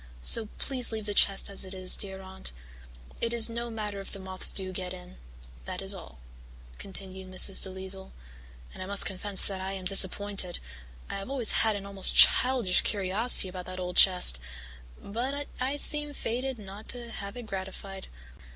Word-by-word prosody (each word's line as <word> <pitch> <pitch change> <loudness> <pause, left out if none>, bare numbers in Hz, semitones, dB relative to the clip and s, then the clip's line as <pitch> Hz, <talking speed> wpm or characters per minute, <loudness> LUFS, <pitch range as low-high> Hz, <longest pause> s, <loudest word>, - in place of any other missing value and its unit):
So 225 - +2
please 255 -4 -3
leave 220 -2 -6
the 205 - -4
chest 195 -1 +3
as 200 0 -1
it 190 0 -6
is, 185 -1 +4
dear 190 -1 -5
Aunt. 190 - -7 0.7
It 230 0 -2
is 230 0 +4
no 235 +1 -6
matter 210 -3 -6
if 195 - -9
the - - -6
moths 190 -1 0
do 190 -1 -2
get 185 0 -6
in.' 180 - -15 0.5
That - - -7
is - - -4
all," - - -13 0.6
continued 190 -1 -6
Mrs. 185 +1 +2
DeLisle, 190 0 -5 0.6
"and - - -12
I 185 - -7
must 200 0 +3
confess 195 0 +3
that 195 -2 -3
I 190 +1 -5
am 190 -1 -8
disappointed. 195 -1 +4 0.5
I - - -6
have 195 - -9
always 260 -5 +3
had 220 -1 +1
an 200 -1 -8
almost 195 -1 +3
childish 250 -7 +6
curiosity 200 +2 +1
about 180 -1 -9
that 185 0 -8
old 180 -1 -6
chest, 180 - +5 0.6
but 260 +7 -5
I 260 +3 -3
seem 295 0 +1
fated 255 +2 -4
not 205 +1 -12
to 240 -1 -5
have 200 +2 -7
it 245 - -8
gratified. 195 -1 -9
195 Hz, 180 wpm, -27 LUFS, 190-225 Hz, 0.7 s, childish